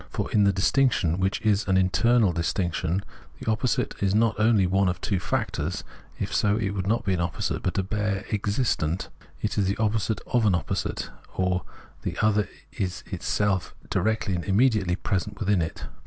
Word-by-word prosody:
For - - -3
in 105 -2 +4
the 100 - +5
distinction, 95 - +2
which 95 +1 +1
is 105 -2 +2
an 95 -1 +3
internal 100 +2 +3
distinction, 85 +1 -1 0.4
the 110 - -1
opposite 115 +3 0
is 100 0 +2
not 115 0 +4
only 110 -3 +4
one 95 +1 +2
of 90 -1 -3
two 95 0 -1
factors 90 - -2 0.2
— - - -26
if - - -3
so, 105 0 +2
it 100 -4 -1
would 100 -1 -3
not 115 +3 +1
be 95 - +2
an 90 - -1
opposite, 85 -2 -2
but 90 - -2
a 95 - +2
bare 105 0 -1
existent 100 - 0 0.2
— - - -26
it - - 0
is 100 - +2
the 100 - 0
opposite 110 -1 0
of 120 -3 +2
an 95 - +4
opposite, - - -2 0.2
or 90 -1 0 0.4
the - - -4
other 105 -2 +2 0.2
is 95 -2 -3
itself 100 -2 0 0.2
directly 105 +1 +1
and 85 -1 -2
immediately 105 -3 +3
present 100 +1 -2
within 100 -3 +2
it. 80 0 -4
100 Hz, 185 wpm, -26 LUFS, 90-110 Hz, 0.4 s, the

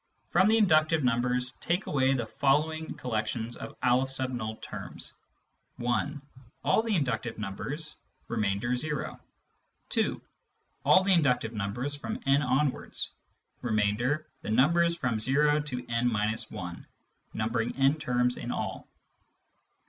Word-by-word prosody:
From 190 - +5
the 220 +1 +5
inductive 155 -6 +4
numbers, 125 +1 +1
take 175 +3 0
away 135 -1 +2
the 120 -3 -1
following 150 +7 +1
collections 115 0 -2
of - - -8
N 125 -3 +1
terms: - - -6 0.3
— - - -47
(1) 120 +5 -1 0.4
All - - +4
the 225 -2 0
inductive 125 - -1
numbers— 135 +10 -4 0.3
.remainder, 110 +2 0
zero. 150 +3 -3 0.7
(2) - - +1 0.6
All 185 - +6
the 195 0 +4
inductive 125 -9 +2
numbers 115 +7 -2
from 220 - -5
n 140 +1 +4
onwards— 135 +1 0 0.5
remainder, 120 +6 +1 0.2
the - - -6
numbers 170 +9 +4
from 125 -8 0
o 150 +2 +4
to 130 -5 -4
n— 120 +1 +1 0.4
1, 90 -1 -7 0.5
numbering 115 +1 -1
n 135 +1 +4
terms 125 -4 +2
in 120 - -4
all. - - -4
125 Hz, 125 wpm, -29 LUFS, 115-150 Hz, 0.7 s, All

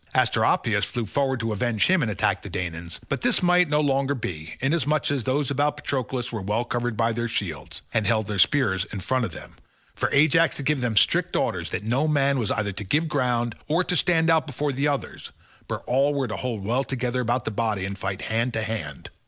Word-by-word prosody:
Asteropaeus - - +2
flew 120 -2 -2
forward 135 +3 0
to 115 -1 -1
avenge 110 0 +1
him 185 -1 +3
and 115 - 0
attack 105 - 0
the - - -8
Danaans, 85 -2 -5
but - - -2
this 240 -5 +2
might 180 -1 +4
no 150 0 +2
longer 140 -1 +1
be, 80 - -6
inasmuch 150 +1 +1
as 135 -6 -1
those 140 +1 0
about 145 +2 +1
Patroclus 130 -3 -2
were 110 -3 -4
well 105 +5 0
covered 120 -1 -2
by 115 0 +2
their 120 +1 -2
shields, 80 -11 -4
and 110 -2 +1
held 110 0 +2
their 100 -1 -3
spears 95 -2 +3
in 100 - -7
front 125 +6 0
of 95 - -5
them, - - -11 0.4
for - - -1
Ajax 155 +1 +4
had 140 - -5
given 145 -1 +1
them 115 -3 -1
strict - - +3
orders - - 0
that - - -3
no 125 +8 +1
man 140 -2 +2
was 110 - -1
either 105 -2 0
to 100 - -5
give 150 - +1
ground, 120 -5 0
or 165 +4 +2
to 180 - 0
stand 165 -2 +3
out 160 -1 +2
before 145 +1 -2
the 140 +3 0
others, 140 -2 -3 0.4
but - - -4
all 140 +3 +2
were 135 -2 0
to 110 - -4
hold 115 -6 -4
well 125 +5 +1
together 125 -1 -2
about 120 0 -1
the - - -1
body 105 -3 -1
and 100 0 -5
fight 95 0 -3
hand 115 +2 -1
to 110 - -1
hand. 95 -10 -5
120 Hz, 225 wpm, -25 LUFS, 110-145 Hz, 0.4 s, might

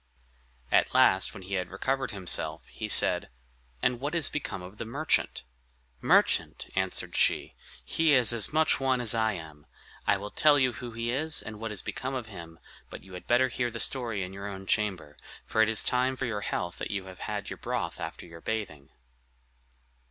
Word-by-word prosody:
At - - +3
last, 95 0 +5
when 95 - -9
he 95 +2 -7
had 90 -2 -1
recovered 135 +8 -1
himself, 95 -3 -2
he - - -6
said, - - +5 0.5
"And 125 -1 +2
what 145 +5 -3
is 165 -5 +4
become 135 -10 -4
of 95 +4 -11
the - - -2
merchant?" 140 +8 -1 0.6
"Merchant!" - - +3
answered 95 0 0
she; - - +2 0.3
"he 160 -2 +2
is 125 -3 +6
as 115 -3 +2
much 155 +1 +3
one 130 -1 +1
as 120 -2 +2
I 110 -1 +1
am. 80 -5 -10 0.4
I 100 - +4
will 105 +1 -7
tell 150 -1 +5
you 130 -3 +2
who 120 -1 -7
he 115 +1 -2
is, 155 +4 -1
and 110 -1 -8
what 115 -1 -4
is 105 - -1
become 130 +1 -4
of 125 -3 -3
him; 85 -6 -10 0.3
but - - -9
you 95 - -14
had 90 - -9
better 125 +2 +4
hear 120 0 -1
the 115 0 -7
story 115 -7 0
in 90 +1 -7
your 100 +1 -6
own 95 -1 -7
chamber; 95 -8 -1 0.3
for 110 - +1
it 110 - +4
is 110 - +2
time 125 +1 +1
for 130 - -3
your 105 -4 -2
health 90 -3 -3
that - - -4
you 100 -2 -3
had 95 -1 -6
your - - -6
broth - - -3
after - - -6
your 85 -1 -12
bathing." 100 -11 -4
110 Hz, 195 wpm, -28 LUFS, 95-130 Hz, 0.6 s, is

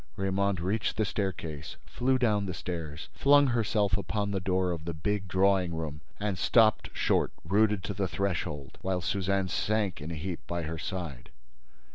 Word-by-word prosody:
Raymonde 95 -1 0
reached 100 +5 -1
the 110 - +2
staircase, 85 -7 -3
flew 130 +1 +1
down 105 -5 +2
the 90 - -3
stairs, 80 -3 -5
flung 145 +1 +6
herself 110 -5 +2
upon 100 +1 -1
the 100 - 0
door 90 0 +1
of 80 -2 -4
the 85 -1 -3
big 100 +5 -1
drawing 95 -2 +2
room 75 -2 -4 0.2
and 100 -3 -1
stopped 110 +1 +4
short, - - +1
rooted 105 +2 +3
to 100 - -3
the 100 0 -1
threshold, 85 -7 -3
while 95 -1 -1
Suzanne 95 +2 0
sank 105 -3 0
in 75 - -5
a 85 - -4
heap 85 +2 -4
by 85 -1 -2
her 80 +1 -4
side. 85 -10 -5
95 Hz, 170 wpm, -29 LUFS, 85-105 Hz, 0.2 s, flung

